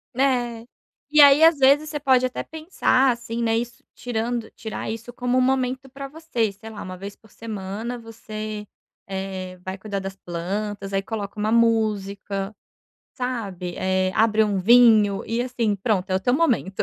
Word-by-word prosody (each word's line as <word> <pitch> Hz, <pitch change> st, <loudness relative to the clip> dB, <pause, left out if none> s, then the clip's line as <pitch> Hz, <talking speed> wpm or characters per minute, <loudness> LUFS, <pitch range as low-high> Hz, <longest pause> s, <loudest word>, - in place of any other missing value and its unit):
Né, 245 Hz, -3 st, 0 dB, 0.4 s
e 300 Hz, 0 st, +3 dB
aí 285 Hz, +2 st, +8 dB
às 325 Hz, -2 st, +7 dB
vezes 280 Hz, +3 st, +4 dB
você 295 Hz, -, -3 dB
pode 260 Hz, -3 st, +3 dB
até 255 Hz, -, -2 dB
pensar 310 Hz, -5 st, +1 dB
assim, 235 Hz, -1 st, -4 dB
né, 225 Hz, -1 st, +2 dB
isso 235 Hz, 0 st, -5 dB
tirando, 235 Hz, -1 st, -3 dB
tirar 220 Hz, -1 st, -6 dB
isso 230 Hz, +2 st, -7 dB
como 250 Hz, +1 st, -1 dB
um -, -, +3 dB
momento 260 Hz, 0 st, 0 dB
para 275 Hz, +1 st, -7 dB
você 275 Hz, -8 st, -2 dB
sei 215 Hz, +3 st, -12 dB
lá 215 Hz, -, -8 dB
uma 185 Hz, -1 st, -7 dB
vez 200 Hz, +2 st, -8 dB
por 220 Hz, -, -23 dB
semana 220 Hz, +2 st, -5 dB
você, 215 Hz, -2 st, -7 dB, 0.4 s
eh, 190 Hz, -1 st, -5 dB
vai 185 Hz, -, -4 dB
cuidar 200 Hz, +1 st, -5 dB
das 195 Hz, 0 st, -6 dB
plantas 195 Hz, +3 st, -4 dB
aí 195 Hz, -, +1 dB
coloca 210 Hz, 0 st, -5 dB
uma 215 Hz, +1 st, 0 dB
música, 205 Hz, -3 st, 0 dB, 0.6 s
sabe? 205 Hz, -9 st, -4 dB
Eh, 185 Hz, 0 st, 0 dB
abre 220 Hz, 0 st, +4 dB
um 200 Hz, -3 st, 0 dB
vinho 220 Hz, -2 st, +5 dB
e 230 Hz, +2 st, 0 dB
assim 240 Hz, -4 st, -1 dB
pronto 200 Hz, -1 st, -1 dB
é -, -, +1 dB
o 190 Hz, -, +1 dB
teu 245 Hz, +6 st, +1 dB
momento, 250 Hz, -, +1 dB
225 Hz, 170 wpm, -23 LUFS, 200-250 Hz, 0.6 s, aí